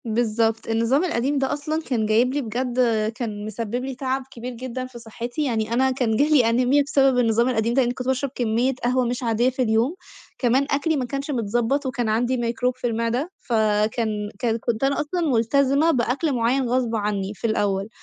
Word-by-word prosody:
بالضبط، 225 0 0
النظام 230 +7 +2
القديم 285 -4 0
ده 270 +1 0
أصلًا 305 +2 -2
كان 240 -8 -1
جايب 230 +4 +2
لي 290 - 0
بجد 245 +1 -3 0.4
كان 210 -4 -4
مسبِّب 215 +1 -4
لي 265 -1 -5
تَعَب 265 +1 -2
كبير 245 +1 -7
جدًا 255 +1 -5
في 255 -2 -11
صحتي، 240 +5 -5
يعني 225 -3 -1
أنا 260 +2 +3
كان 245 -4 0
جالي 285 -4 +4
أنيميا 255 +5 +3
بسبب 270 -2 +3
النظام 235 +1 +2
القديم 230 -1 0
ده، 265 - +4
لإنّي 245 -1 0
كنت 250 0 -6
باشرب 265 +1 0
كمية 240 +2 +1
قهوة 250 +1 +2
مش 245 +1 -2
عادية 235 +2 +2
في 260 0 -4
اليوم، 235 +6 +1 0.4
كمان 255 +2 +2
أكلي 310 +3 +1
ما 260 - -1
كانش 275 +3 -4
متضبَّط 240 +3 0
وكان 250 -3 -1
عندي 240 +4 +1
ميكروب 240 +1 -1
في 250 - -2
المعدة، 230 +7 -1
فكان 215 -1 0
كان 230 -2 0
كنت 230 +1 -2
أنا 275 +2 +2
أصلًا 325 +5 -2
ملتزمة 275 +6 +3
بأكل 270 +3 0
معيّن 245 +1 +1
غصب 245 -2 0
عنّي 205 -2 -2
في 220 - -3
الأول، 200 -2 0
245 Hz, 190 wpm, -23 LUFS, 225-265 Hz, 0.4 s, جالي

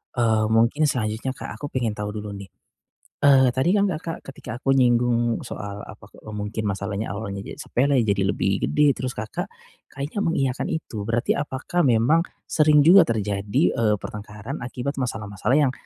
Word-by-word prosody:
Eee, 110 -3 +2
mungkin 115 +7 +3
selanjutnya 120 0 -2
Kak, - - -7
aku 145 - -4
pengen 125 -5 -1
tahu 105 0 -5
dulu 105 -1 -5
nih. 100 -1 -8 0.7
Eee, 135 -3 +5
tadi 135 +10 +2
kan 200 -1 +2
Kakak 165 0 -5
ketika 125 -3 -8
aku 135 +2 0
nyinggung 120 -2 +2
soal, 100 0 -7
apa, 105 -1 -12
ke - - -22
eee, 110 - -9
mungkin 105 +1 -4
masalahnya 100 +2 -4
awalnya 100 -1 -5
je - - -9
sepele, 135 +2 +1
jadi 100 -4 +1
lebih 95 -1 -1
gede, 150 -2 +3
terus 130 -1 -3
Kakak 110 -2 -5 0.4
kayaknya 145 +9 -3
mengiyakan 135 -7 0
itu, 115 -10 -4
berarti 115 +3 0
apakah 145 +5 -1
memang 125 +6 +4 0.2
sering 150 -1 +4
juga 185 +1 +9
terjadi, 105 -5 -1
eee, 110 -2 +2
pertengkaran 105 +7 -7
akibat 125 +3 -4
masalah-masalah 110 0 -1
yang 140 -4 +3
120 Hz, 165 wpm, -23 LUFS, 105-140 Hz, 0.7 s, juga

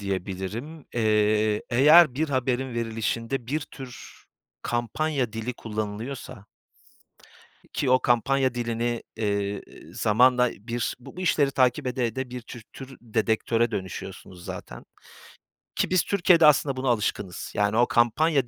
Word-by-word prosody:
diyebilirim, 100 - -5
eee, 105 -1 +2
eğer 150 +3 +7
bir 155 +3 -1
haberin 130 -1 -1
verilişinde 115 +2 -2
bir 150 +5 -1
tür 135 -4 -11 0.4
kampanya 125 +1 -1
dili 115 +2 -4
kullanılıyorsa 110 +2 -6 1.3
ki 135 - 0
o 130 0 +5
kampanya 130 +2 +2
dilini, 120 0 -2
eee, 100 -2 -1 0.3
zamanla 125 +3 +4
bir 120 +3 -4
bu 120 - -13
bu - - -6
işleri 150 -6 +2
takip 130 +1 +2
ede 125 -1 0
ede 130 +3 -4
bir 125 0 -5
tür 120 0 -10
tür 135 0 -10
dedektöre 115 0 0
dönüşüyorsunuz 95 -2 -7
zaten - - -8 0.9
ki - - 0
biz 185 -2 +3
Türkiye'de 175 -4 +4
aslında 140 -2 +4
buna 130 0 -2
alışkınız. 105 -5 -2
Yani, 105 +2 +1
o 120 - +4
kampanya 135 +4 +2
120 Hz, 125 wpm, -25 LUFS, 110-135 Hz, 1.3 s, eğer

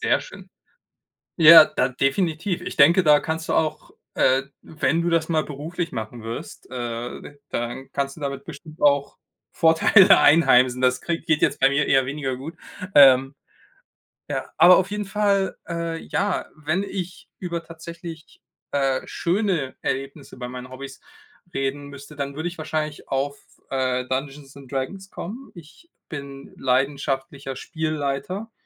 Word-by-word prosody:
Sehr 445 - +2
schön. - - -12 0.9
Ja, 165 -1 +10
da 125 - -1
definitiv. 160 +7 -1
Ich - - -6
denke, 170 +6 +6
da 150 -3 +5
kannst 160 0 -4
du - - 0
auch, 155 -1 -1 0.2
äh, 130 +1 +3 0.2
wenn 160 +1 -1
du 175 - 0
das 165 -1 +1
mal 160 -2 +1
beruflich 165 +4 -5
machen 110 +2 -6
wirst, 115 +1 -8
äh, 120 -1 -5
d 145 - -13
dann 120 +3 -4
kannst 140 0 -2
du - - -12
damit 140 -1 -4
bestimmt 155 0 -11
auch 140 -1 +2 0.3
Vorteile 165 +4 +6
einheimsen. 130 -5 +5
Das 125 0 +2
kriegt 170 -1 -4
geht 155 -3 +1
jetzt - - +1
bei 135 - +6
mir 140 +2 +1
eher 135 -1 +3
weniger 135 -2 -3
gut, 155 +6 -8 0.4
ähm. 135 -1 +7 1.0
Ja, - - -3
aber 175 +2 +8
auf 185 - +1
jeden 210 -1 -3
Fall, 200 -1 0
äh 170 -1 -3
ja, 200 +3 -2
wenn 155 +5 -2
ich 185 -2 -7
über 170 -2 -4
tatsächlich, 165 0 -10 0.3
äh, 135 -2 0
schöne 175 -7 -1
Erlebnisse 135 +2 -4
bei 125 -1 -6
meinen 125 0 -8
Hobbys 135 +1 -9 0.5
reden 140 0 -3
müsste, 140 +1 -12
dann 140 -1 -5
würde 160 +3 -2
ich 175 - -10
wahrscheinlich 155 -1 -4
auf, 140 +1 -2 0.3
äh, 130 -1 0
Dungeons 135 +1 -5
and 135 -3 -13
Dragons 190 +9 -4
kommen. 235 +10 -8
Ich 170 - -15 0.2
bin 140 -3 -9
leidenschaftlicher 135 +1 -1
Spielleiter 155 - -4
145 Hz, 150 wpm, -23 LUFS, 135-170 Hz, 1.0 s, Ja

